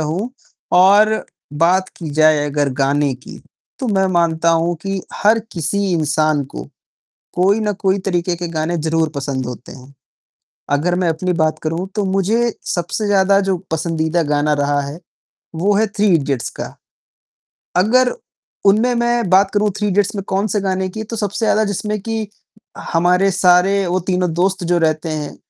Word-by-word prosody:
हूँ 170 +10 -2 0.4
और 205 +4 +5 0.3
बात 175 +5 +2
की 160 -3 -6
जाए 155 -1 +4
अगर 145 0 0
गाने 140 +1 +2
की 125 - -12 0.4
तो 265 - -3
मैं 190 -2 +2
मानता 170 -1 +2
हूँ 165 +1 +1
कि 195 -1 -3
हर 215 +2 +3
किसी 170 +2 -2
इंसान 155 -2 +1
को 135 - -8 0.7
कोई 195 +4 +2
न 210 -1 0
कोई 195 -1 +2
तरीके 175 -1 0
के 175 0 -5
गाने 160 +2 -1
ज़रूर 160 0 0
पसंद 135 -2 -3
होते 125 0 -8
हैं, 135 +2 -14 0.8
अगर 160 +5 +1
मैं 180 -1 +1
अपनी 180 +3 -1
बात 155 0 +1
करूँ 165 +4 -2
तो 210 -2 0
मुझे 205 +5 +1 0.2
सबसे 175 +5 -2
ज़्यादा 195 0 +3
जो 190 - +1
पसंदीदा 160 +1 0
गाना 150 0 +1
रहा 145 0 0
है, 140 +3 -7 0.6
वो 195 +6 +1
है 220 +2 +3
थ्री 205 0 -1
इडियट्स 140 -6 0
का। - - -6 1.0
अगर 245 +7 +3 0.5
उनमें 220 +5 +4
मैं 240 -2 0
बात 190 +1 +4
करूँ 210 0 +2
थ्री 210 0 0
इडियट्स 200 +1 +1
में 200 - -3
कौन-से 200 +2 0
गाने 190 -1 -1
की 220 +4 -6
तो 230 +2 -6
सबसे 205 +1 -2
ज़्यादा 215 0 +3
जिसमें 210 +1 -2
कि 225 -1 -3 0.6
हमारे 180 +3 +3
सारे 190 +1 +3
वो 180 +1 0
तीनों 180 -2 0
दोस्त 185 +1 0
जो 175 +1 +2
रहते 155 -1 0
हैं, 155 -2 -4
180 Hz, 165 wpm, -18 LUFS, 155-200 Hz, 1.0 s, और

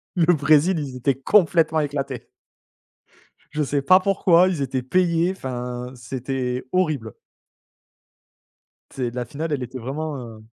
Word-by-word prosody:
Le 175 0 +4
Brésil 155 +4 +3
ils 135 -3 -5
étaient 125 +1 0
complètement 165 -4 +3
éclatés. 140 -3 -3 1.2
Je 150 0 -1
sais 140 0 -1
pas 185 +6 +6
pourquoi 185 -2 +4
ils 165 -6 -2
étaient 130 -1 -1
payés, 175 +3 +2
enfin, 125 -3 -5
c'était 125 0 -4
horrible. 155 - -1 1.8
C'est 125 -3 -3
la 125 0 -4
finale, 155 +6 -5
elle 135 -3 -1
était 125 +1 -7
vraiment, 145 +5 -4
heu, 115 -3 -10
140 Hz, 130 wpm, -23 LUFS, 125-165 Hz, 1.8 s, pas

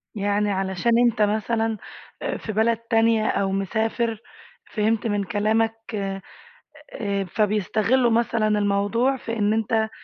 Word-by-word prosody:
يعني 205 0 0
علشان 190 +3 -1
أنت 235 -3 +2
مثلًا 220 +1 0 0.4
آآ - - -2
في 220 - -6
بلد 220 +2 +2
تانية 225 -1 +2
أو 195 -1 0
مسافر، 220 +3 -1 0.5
فهمت 220 +1 0
من 205 -1 0
كلامك 220 +3 +1 0.9
آآ، 200 -2 -4
فبيستغلّوا 215 +5 +1
مثلًا 230 -1 +1
الموضوع 210 +5 +1
في 230 -2 -5
إن 210 0 +2
أنت 220 0 0
220 Hz, 120 wpm, -23 LUFS, 205-225 Hz, 0.9 s, أنت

